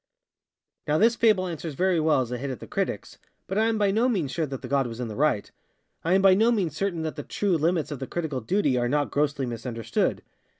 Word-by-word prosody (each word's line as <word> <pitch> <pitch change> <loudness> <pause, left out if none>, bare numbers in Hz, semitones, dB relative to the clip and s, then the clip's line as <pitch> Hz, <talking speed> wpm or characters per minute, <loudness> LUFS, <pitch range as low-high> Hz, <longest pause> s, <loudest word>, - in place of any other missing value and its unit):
Now 150 +1 +2
this 230 +6 +4
fable 215 -5 +3
answers 165 -3 -5
very 185 +1 +2
well 155 -3 +3
as 125 -1 -4
a 125 - -3
hit 140 +2 -4
at 130 -5 -5
the - - -9
criticsŌĆöbut - - -3 0.4
I 220 - +3
am 225 -1 +1
by 205 -2 +2
no 230 +5 +2
means 175 - -1
sure 160 -2 -1
that 135 -1 -7
the - - -5
god 135 0 +1
was 115 0 -7
in 120 -2 -3
the 105 - -6
right. 140 -6 +1 0.5
I 170 +3 +2
am 195 - +3
by 195 -1 +7
no 220 +5 +4
means 185 -10 0
certain 175 -2 -2
that 155 0 -4
the - - -3
true 200 +3 0
limits 165 0 0
of 145 - -5
the 135 - -5
critical 155 -7 -3
duty 145 - +1
are 120 0 0
not 145 +1 0
grossly 145 -2 0
misunderstood. 115 -1 -2
155 Hz, 245 wpm, -26 LUFS, 130-190 Hz, 0.5 s, by